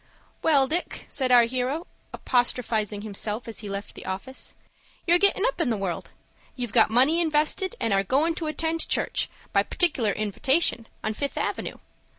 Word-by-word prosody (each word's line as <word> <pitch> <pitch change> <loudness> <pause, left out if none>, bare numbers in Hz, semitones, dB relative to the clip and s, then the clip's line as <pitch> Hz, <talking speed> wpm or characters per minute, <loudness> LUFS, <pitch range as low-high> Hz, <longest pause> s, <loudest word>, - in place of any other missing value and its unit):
"Well, 285 -4 +4
Dick," 345 +5 -2
said 260 -2 0
our 245 -1 +8
hero, 255 +7 -2 0.3
apostrophizing 220 -4 0
himself, 215 +2 -2
as 225 - -5
he 210 - -7
left 200 +1 -5
the - - -10
office; 195 +8 -5 0.5
"you're 345 +1 +4
gettin' 400 +2 +3
up - - 0
in 310 - +1
the 225 - 0
world. 190 -4 -4 0.5
You've 245 -4 -5
got - - +5
money 265 +9 +4
invested, 315 +6 +1
and 225 - 0
are 195 - +3
goin' 290 - +2
to 320 - -3
attend 320 +2 -2
church, - - +1 0.2
by - - +5
partic'lar 270 - +2
invitation, 230 - +1 0.2
on 215 - -1
Fifth 280 +6 -3
Avenue. - - -3
255 Hz, 165 wpm, -25 LUFS, 215-320 Hz, 0.5 s, our